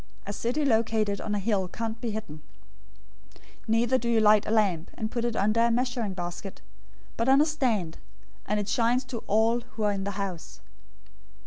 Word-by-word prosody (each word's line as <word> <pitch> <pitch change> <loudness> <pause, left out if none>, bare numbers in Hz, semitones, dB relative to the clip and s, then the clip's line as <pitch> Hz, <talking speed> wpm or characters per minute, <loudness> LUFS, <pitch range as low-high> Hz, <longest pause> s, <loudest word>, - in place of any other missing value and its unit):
A 205 - -4
city 250 +8 -1
located 220 -4 +1
on 210 - -2
a - - 0
hill 200 -2 0
can't 225 +4 -5
be 240 - -2
hidden. 205 -9 -6 1.0
005:015 - - -25 0.3
Neither 235 +3 +3
do 235 - -2
you 230 -1 +3
light 215 -1 +5
a - - -1
lamp, 200 -7 +1
and 220 0 -4
put 235 -2 -2
it 235 -1 -1
under 215 +3 +2
a 235 - +4
measuring 240 -4 -1
basket, 175 +2 -6 0.6
but 230 +3 +1
on 270 +1 +6
a 300 - +5
stand; 235 - -1 0.5
and 210 +1 0
it 205 - -3
shines 240 +3 +2
to 250 -2 -6
all 225 +3 +3
who 225 -2 -7
are 210 - +3
in 195 -1 -3
the 200 - -2
house. 190 -5 -5
220 Hz, 195 wpm, -27 LUFS, 200-235 Hz, 1.0 s, on